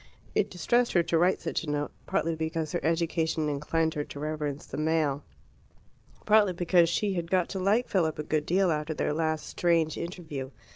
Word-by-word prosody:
It -, -, +1 dB
distressed 235 Hz, +7 st, +1 dB
her 175 Hz, -, +4 dB
to 170 Hz, 0 st, +1 dB
write 180 Hz, +2 st, +2 dB
such 165 Hz, -, -2 dB
a 155 Hz, -, -5 dB
note, 145 Hz, 0 st, -1 dB, 0.2 s
partly 165 Hz, -, 0 dB
because 160 Hz, -1 st, -2 dB
her -, -, -2 dB
education 160 Hz, -1 st, 0 dB
inclined 160 Hz, +3 st, 0 dB
her 150 Hz, -, -2 dB
to 145 Hz, -, -9 dB
reverence 150 Hz, -1 st, -3 dB
the -, -, -7 dB
male, 155 Hz, -2 st, +1 dB, 1.0 s
partly 210 Hz, -3 st, +5 dB
because 175 Hz, -1 st, +3 dB
she 200 Hz, +3 st, 0 dB
had 170 Hz, -2 st, -3 dB
got 180 Hz, -2 st, +2 dB
to 195 Hz, -, -4 dB
like 205 Hz, +6 st, +2 dB
Philip 165 Hz, -5 st, +1 dB
a 150 Hz, -, -3 dB
good 150 Hz, 0 st, -1 dB
deal 185 Hz, 0 st, +3 dB
after 155 Hz, 0 st, -2 dB
their -, -, 0 dB
last 155 Hz, 0 st, -1 dB
strange 165 Hz, -2 st, +1 dB
interview. 160 Hz, -6 st, -5 dB
165 Hz, 190 wpm, -28 LUFS, 155-175 Hz, 1.0 s, partly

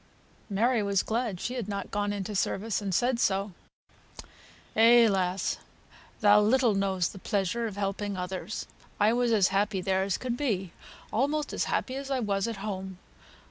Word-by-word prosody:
Mary 225 Hz, +4 st, +2 dB
was 200 Hz, -2 st, +1 dB
glad 225 Hz, -5 st, -2 dB
she 245 Hz, -, -3 dB
had 240 Hz, -6 st, -4 dB
not 200 Hz, -2 st, -4 dB
gone 205 Hz, 0 st, -1 dB
into 205 Hz, 0 st, -4 dB
service, 205 Hz, +2 st, -1 dB
and 200 Hz, -2 st, -3 dB
said 240 Hz, +6 st, +1 dB
so. 195 Hz, 0 st, +1 dB, 1.2 s
"Eh, 230 Hz, +1 st, +7 dB
lass! 190 Hz, -2 st, 0 dB, 0.6 s
thou 210 Hz, 0 st, +6 dB
little 235 Hz, +1 st, +3 dB
knows 190 Hz, -3 st, 0 dB
the 195 Hz, -, -10 dB
pleasure 205 Hz, +5 st, -1 dB
o' -, -, -5 dB
helping 200 Hz, 0 st, -3 dB
others; 180 Hz, +2 st, -4 dB, 0.3 s
I 210 Hz, +2 st, +4 dB
was 245 Hz, -1 st, +1 dB
as 205 Hz, -4 st, +4 dB
happy 200 Hz, +1 st, +1 dB
there 190 Hz, +1 st, +1 dB
as 195 Hz, -1 st, 0 dB
could 250 Hz, -2 st, -3 dB
be; 205 Hz, -, -1 dB, 0.4 s
almost 285 Hz, +6 st, 0 dB
as -, -, 0 dB
happy 255 Hz, -, -1 dB
as 275 Hz, 0 st, -6 dB
I 270 Hz, -2 st, 0 dB
was 200 Hz, -2 st, 0 dB
at 230 Hz, -3 st, -4 dB
home. 190 Hz, -2 st, -5 dB
205 Hz, 170 wpm, -28 LUFS, 195-235 Hz, 1.2 s, Eh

